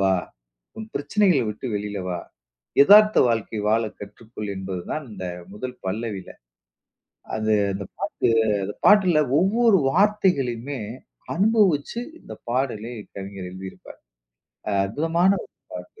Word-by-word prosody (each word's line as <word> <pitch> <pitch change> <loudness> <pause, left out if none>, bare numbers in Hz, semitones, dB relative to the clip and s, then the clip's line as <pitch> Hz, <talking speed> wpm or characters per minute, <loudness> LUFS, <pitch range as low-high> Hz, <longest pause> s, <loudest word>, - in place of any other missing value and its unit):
வா! 95 -1 +4 0.6
உன் 220 0 -6
பிரச்சனைகள 170 +2 +2
விட்டு 105 +5 -5
வெளில 105 0 -3
வா! 90 -1 -2 0.6
எதார்த்த 210 +6 +7
வாழ்க்கை 115 -1 -1
வாழ 115 +1 +3 0.2
கற்றுக்கொள்." 105 +1 -8
என்பது 95 -1 -4
தான் 155 - -3
இந்த 95 -2 -6 0.3
முதல் 125 +5 -6
பல்லவில. 100 -1 -4 1.1
அது 110 0 0 0.2
அந்த 100 +1 -5
பாட்டு - - -1 0.3
அந்த 100 +2 -4
பாட்டுல 185 -6 +6 0.2
ஒவ்வொரு 210 +3 +4
வார்த்தைகளையுமே 145 - +1 0.5
அனுபவிச்சு 205 -2 +2 0.2
இந்த - - -11 0.2
பாடலை 120 -2 -2 0.2
கவிஞர் 95 -1 -7
எழுதியிருப்பாரு. 95 +1 -10 0.7
அ - - 0
அற்புதமான 165 - +1
ஒரு - - -20 0.2
பாட்டு. 435 - -10
125 Hz, 115 wpm, -23 LUFS, -, 1.1 s, எதார்த்த